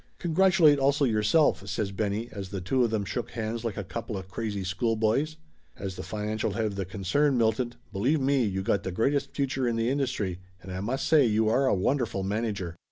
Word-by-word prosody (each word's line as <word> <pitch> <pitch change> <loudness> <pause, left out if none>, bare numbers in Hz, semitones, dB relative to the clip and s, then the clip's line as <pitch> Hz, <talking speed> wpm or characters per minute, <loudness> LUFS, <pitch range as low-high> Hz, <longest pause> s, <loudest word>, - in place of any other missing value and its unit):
"Congratulate 175 -3 +4
also 140 +1 +3
yourself!" 110 0 +2
says 100 +1 -2
Benny 105 +3 -2
as 100 -3 -6
the 100 0 -4
two 125 +9 +1
of 120 - +2
them 110 -2 -1
shook 80 - -3
hands 115 0 -4
like 115 -4 -3
a 100 - -2
coupla 105 0 -5
crazy 100 +1 -4
schoolboys. 115 - 0 0.4
"As 95 -2 -5
the - - -6
financial 105 +2 -2
head 110 +1 -1
of 105 -2 -2
the 100 -1 -2
concern, 115 +9 +1
Milton, 120 +1 +1 0.2
believe 130 +11 +1
me 135 -1 +2
you 95 -3 -1
got 100 - +1
the 95 - -4
greatest 135 +9 0
future 135 -2 0
in 120 - 0
the 115 +2 +1
industry, 125 -10 -1 0.2
and 95 0 -10
I 90 - -4
must 120 +7 -2
say 150 -5 +5
you 110 0 +2
are 130 +4 +3
a 130 - +3
wonderful 110 0 0
manager 100 -4 -2
110 Hz, 205 wpm, -27 LUFS, 100-130 Hz, 0.4 s, say